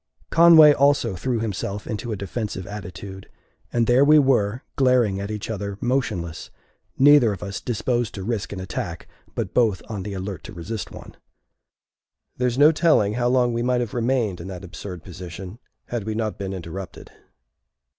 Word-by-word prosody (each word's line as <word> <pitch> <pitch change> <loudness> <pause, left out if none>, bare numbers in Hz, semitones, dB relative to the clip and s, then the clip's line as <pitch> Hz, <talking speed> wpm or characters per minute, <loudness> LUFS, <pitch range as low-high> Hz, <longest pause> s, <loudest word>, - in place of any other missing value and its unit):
Conway 165 -3 +8
also 140 -7 +2
threw 120 +5 -1
himself 105 -1 -4
into 115 +1 -4
a - - -1
defensive 100 0 -4
attitude, 95 -1 -8 0.4
and 120 -1 +2
there 125 +4 +5
we 150 +2 +6
were, 125 -5 +2
glaring 125 -7 +3
at 100 - -5
each 105 -2 -4
other 100 -2 -4
motionless, 105 -10 -2 0.5
neither 140 -4 +6
of 100 -2 -6
us 100 0 -5
disposed 120 0 -1
to 95 - -5
risk 110 0 -3
an 100 - -5
attack, 95 - -5 0.3
but - - -3
both 110 -7 +2
on 105 -3 -4
the 100 +1 -5
alert 95 0 -5
to 110 - -9
resist 100 +4 -5
one. - - -12 1.2
There 125 - +1
is 120 0 -2
no 150 +3 +7
telling 155 -11 +3
how 120 +1 0
long 125 -1 +2
we 115 - -1
might 125 0 +1
have 120 -4 -4
remained 115 -6 0
in 85 - -8
that 95 -2 -7
absurd 90 -1 -8
position, 90 +3 -9 0.3
had 120 -3 -3
we 110 0 -3
not 110 -2 -3
been 95 -1 -4
interrupted. 95 0 -8
110 Hz, 175 wpm, -23 LUFS, 95-125 Hz, 1.2 s, Conway